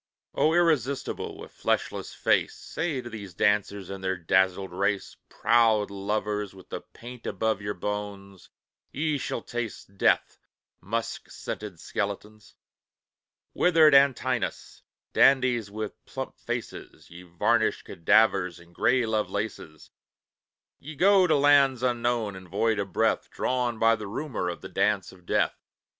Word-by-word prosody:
O 160 +2 +2
irresistible, 145 -6 0
with - - -11
fleshless - - -2
face, - - +1
Say 160 -4 -3
to 120 - -7
these 100 -5 -8
dancers 100 -1 0
in 100 -1 -6
their 95 0 -1
dazzled 95 +2 +1
race: 100 +2 -1
"Proud 110 -3 +3
lovers 105 0 -2
with 95 - -15
the - - -5
paint 120 0 -11
above 110 -2 -1
your 105 0 -3
bones, 100 -1 -6 0.4
Ye 150 0 -1
shall 120 - -4
taste 115 -4 -6
death, - - +2 0.4
musk 115 +5 -4
scented 100 -6 -7
skeletons! 105 +2 -5 1.0
Withered 160 -4 +5
Antinous, 130 -4 +2 0.3
dandies 125 -5 +4
with 105 +1 -6
plump - - -7
faces, - - -6
Ye 85 +1 -10
varnished 85 -2 0
cadavers, 95 -1 +2
and 85 0 -18
grey 125 +6 +2
Lovelaces, 105 -7 -3 0.9
Ye 155 +2 -9
go 190 +3 +5
to 155 - +3
lands 140 -3 +4
unknown 120 -4 0
and 95 -1 -11
void 105 +3 +1
of 100 -1 -3
breath, - - +1
Drawn 125 -2 -1
by 115 +1 +4
the 105 -2 -7
rumour 110 -4 -3
of 85 - -6
the - - -8
Dance 105 -3 0
of 90 -2 -19
Death. - - +2
110 Hz, 135 wpm, -27 LUFS, 100-125 Hz, 1.0 s, Withered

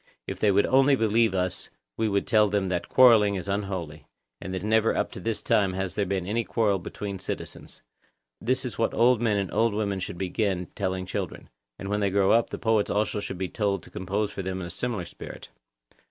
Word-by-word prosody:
If - - -6
they 105 - +3
would 100 +1 +4
only 135 +1 +4
believe 110 -3 +2
us 90 -1 -2 0.3
we 110 -1 0
would 100 -1 0
tell 105 -2 +4
them 100 -2 0
that 90 -1 -2
quarrelling 110 -6 +6
is 95 0 -5
unholy, 95 -6 -4 0.3
and 95 - -6
that 95 +1 -4
never 110 +1 +2
up - - -1
to - - -8
this 115 -1 -3
time 95 -3 +2
has 95 -1 -3
there 100 -2 -1
been 95 -1 -1
any 115 +5 0
quarrel 105 -4 +1
between 100 +2 -6
citizens; - - -7 0.6
this 130 +3 0
is 125 - -6
what 115 - +1
old 120 0 +4
men 110 -3 +2
and 100 -2 -2
old 110 -1 +2
women 100 -2 -1
should 90 - -5
begin 95 0 -1
by - - -24
telling 95 -2 -2
children; 90 - -5 0.3
and 95 - -7
when 105 0 0
they 100 -1 +1
grow 95 0 +3
up, 115 0 +3
the - - -5
poets 110 -3 +1
also 105 0 0
should 95 - -5
be 95 +1 -2
told 100 -2 -1
to - - -15
compose 100 +3 -2
for 100 - -5
them 95 0 -3
in 90 - -5
a - - -6
similar 105 -2 -3
spirit. - - -10
100 Hz, 225 wpm, -26 LUFS, 95-110 Hz, 0.6 s, quarrelling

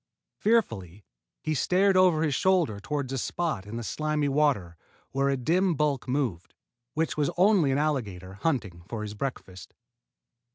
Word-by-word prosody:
Fearfully 105 - 0 0.4
he 155 - 0
stared 185 +6 +3
over 180 -4 +4
his 150 -3 +1
shoulder 170 - +2
toward 135 +5 -3
a 135 - -1
spot 155 - -2
in 110 +3 -6
the 120 - -4
slimy 155 +3 -1
water 135 - +1 0.4
where 135 +1 +1
a 135 - +1
dim 175 +7 +2
bulk 145 -3 0
moved, 125 - -2 0.4
which 160 0 -1
was 150 0 +1
only 185 -6 +4
an 135 - +1
alligator 105 -12 -2
hunting 105 - -2
for 110 -2 -4
his 105 -1 -5
breakfast. 105 -6 -6
140 Hz, 155 wpm, -27 LUFS, 105-160 Hz, 0.4 s, over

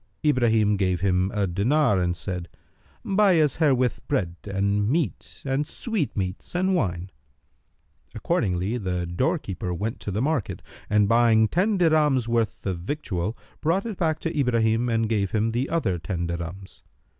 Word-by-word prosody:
Ibrahim 115 -7 +3
gave 90 -3 0
him 95 -1 +2
a 105 -1 0
dinar, 105 - +2
and 90 -1 -1
said, 90 -3 -5 0.6
"Buy 195 -3 +4
us 150 -2 +2
herewith 130 -6 +2
bread 85 -4 0
and 100 +1 0
meat 160 +4 -2
and 135 +2 0
sweetmeats 145 - -3
and 185 +2 +2
wine." 95 - -1 1.0
Accordingly 95 +6 -1
the 90 -3 -2
doorkeeper 95 - -2
went 110 +6 -3
to - - -6
the 100 +2 -2
market; 140 -2 -1 0.3
and, 105 -1 +3
buying 115 -1 +4
ten 195 - +1
dirhams' 150 -8 +3
worth 115 -2 -1
of 95 -3 -2
victual, 105 - -3 0.2
brought 170 +7 +1
it 220 -5 -5
back 160 -3 +1
to 165 0 -3
Ibrahim 115 -3 +2
and 115 -1 +1
gave 105 -3 0
him 110 +1 +1
the 120 +4 -1
other 105 - 0
ten 85 +2 -3
dirhams. 85 +3 -6
110 Hz, 150 wpm, -25 LUFS, 95-150 Hz, 1.0 s, Buy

